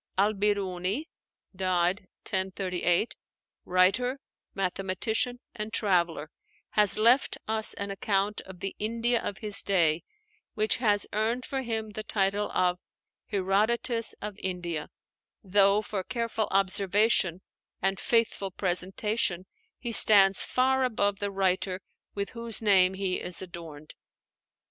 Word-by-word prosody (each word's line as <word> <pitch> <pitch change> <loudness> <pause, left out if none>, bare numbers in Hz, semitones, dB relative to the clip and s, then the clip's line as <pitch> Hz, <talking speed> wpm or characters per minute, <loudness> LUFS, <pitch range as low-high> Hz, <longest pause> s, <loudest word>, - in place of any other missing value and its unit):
Al 205 +3 +3
Birúni 200 - -1 0.5
(died 185 +1 0 0.2
1038), 190 0 0 0.6
writer, 195 +9 +2 0.4
mathematician, 195 +6 -2
and 215 -1 -5
traveler, 170 -7 0 0.4
has 210 -1 +6
left 235 +5 +4
us 220 0 +3
an 200 0 -4
account 200 +1 -1
of 185 -1 -12
the 195 - -4
India 230 +2 0
of 200 - -4
his 210 -2 -3
day 170 -4 +2 0.5
which 215 -1 +2
has 205 -4 +2
earned 225 +4 0
for 270 -2 -3
him 220 -3 -3
the 215 - -5
title 205 -1 0 0.8
"Herodotus 220 +4 0
of 210 -1 -6
India," 175 -4 -3 0.5
though 200 +1 +3
for 205 -2 -4
careful 230 0 -2
observation 195 -1 +2 0.4
and 195 0 0
faithful 230 -4 +1
presentation 185 +1 -1 0.3
he 240 - -5
stands 195 -3 +6
far 265 +1 +1
above 205 -5 0
the 205 - -2
writer 190 -1 0 0.4
with 200 0 -3
whose 230 -2 -2
name 190 -3 +4
he 190 -1 -1
is 180 - -3
adorned. 165 -4 -9
200 Hz, 115 wpm, -28 LUFS, 185-220 Hz, 0.8 s, has